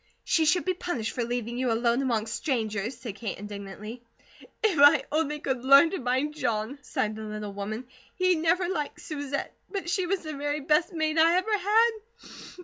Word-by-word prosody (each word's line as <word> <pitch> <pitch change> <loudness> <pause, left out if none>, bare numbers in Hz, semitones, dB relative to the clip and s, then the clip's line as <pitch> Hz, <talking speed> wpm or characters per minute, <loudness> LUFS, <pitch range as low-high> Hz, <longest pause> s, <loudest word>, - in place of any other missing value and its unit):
"She 325 -3 +2
should 340 +3 +2
be 370 - +1
punished 335 -11 -3
for 245 - -2
leaving 240 0 -3
you 255 -2 +1
alone 235 +2 +2
among 230 -5 0
strangers," 225 -2 -2
said 235 -4 -6
Kate 225 - -4
indignantly. 205 +3 -8 0.6
"If 390 -9 +2
I 285 +2 +7
only 300 -1 0
could 260 -4 -2
learn 275 +5 +7
to 385 - -3
mind 260 +4 0
John," 230 -2 -2
sighed 215 -4 -2
the 220 - -7
little 210 -1 -6
woman. 215 +5 -5 0.3
"He 370 0 +3
never 340 +2 +1
liked 315 -6 -3
Susette. 285 -2 -4 0.2
But 385 -4 -3
she 370 -1 0
was 390 +1 0
the 310 -1 -6
very 290 +1 -2
best 300 +4 +2
maid 315 -2 0
I 330 +2 +5
ever 405 +4 +2
had. 430 +4 +4
280 Hz, 185 wpm, -27 LUFS, 230-330 Hz, 0.6 s, I